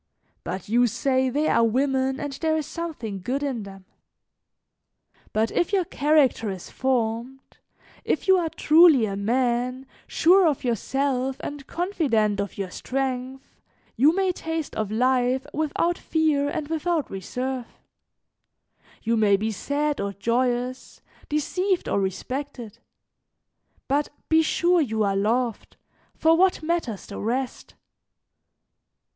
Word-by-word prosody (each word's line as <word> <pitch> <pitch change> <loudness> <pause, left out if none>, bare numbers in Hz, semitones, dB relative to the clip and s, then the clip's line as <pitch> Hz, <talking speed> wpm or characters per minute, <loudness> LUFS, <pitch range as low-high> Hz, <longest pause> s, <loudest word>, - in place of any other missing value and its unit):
But 185 0 -5
you 240 +3 +3
say 260 +2 +1
they 295 +4 0
are 230 - +3
women 265 +3 +1
and 290 -1 -4
there 315 +3 0
is 310 - -2
something 265 - -5
good 260 +9 -2
in 265 -5 -2
them! 195 -1 -11 1.5
"But 220 +1 0
if 350 - 0
your 385 -3 +2
character 285 -8 +2
is 190 -2 -7
formed, 250 0 -2 0.4
if - - -1
you 380 - +7
are 330 -2 -1
truly 310 -6 +5
a 200 -2 -3
man, 245 +4 0 0.2
sure 360 +2 +5
of 295 -4 0
yourself 260 +2 -1
and 290 -1 -7
confident 260 - 0
of 200 0 -4
your 195 -2 -4
strength, 265 +1 -3 0.5
you 285 +6 +5
may 385 -1 +2
taste 325 -3 -4
of 215 -2 -2
life 250 +3 +1
without 315 +3 0
fear 305 -3 +1
and 290 0 -3
without 320 0 -1
reserve; 250 +6 -4 1.4
you 230 +1 +1
may 210 -3 +4
be 220 +2 -2
sad 290 +7 -1
or 200 0 -3
joyous, 245 +4 -2 0.3
deceived 365 +5 0
or - - +1
respected; 240 +4 -5 1.1
but 285 +2 +1 0.2
be 320 0 +5
sure 345 +2 +2
you 220 -6 0
are 200 -1 +1
loved, 230 +3 -1 0.4
for 325 +1 +4
what 365 -1 +2
matters 310 - -2
the 200 - -8
rest? 250 +4 -3
260 Hz, 130 wpm, -24 LUFS, 225-305 Hz, 1.5 s, you